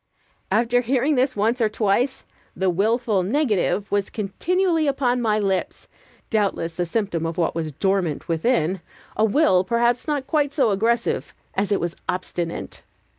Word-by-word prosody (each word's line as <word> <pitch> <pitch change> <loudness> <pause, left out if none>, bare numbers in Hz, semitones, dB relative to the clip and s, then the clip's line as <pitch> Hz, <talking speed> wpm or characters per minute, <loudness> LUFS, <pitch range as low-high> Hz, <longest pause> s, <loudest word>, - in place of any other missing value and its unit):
'" - - -40
After 235 +4 +3
bearing 260 +4 +1
this 255 -1 +1
once 225 +4 +1
or 220 - +3
twice, 220 +5 0 0.3
the 190 -1 +1
willful 215 +2 +1
negative 210 - 0
was 200 -1 0
continually 325 - 0
upon 255 -3 +1
my 215 -2 +2
lips; 195 -3 -2 0.4
doubtless 190 -6 -1
a 175 - 0
symptom 195 -4 -1
of 165 +1 -5
what 170 - +1
was 160 -2 -3
dormant 185 -1 -1
within 170 0 +1 0.3
a 215 - +1
will 215 -5 +4
perhaps 235 +5 +1
not 290 -3 -1
quite 290 -1 0
so 260 -8 +3
aggressive 230 +4 0 0.2
as 200 +1 -1
it 200 - +2
was 170 0 -3
obstinate. 175 -2 -4
215 Hz, 155 wpm, -23 LUFS, 190-250 Hz, 0.4 s, will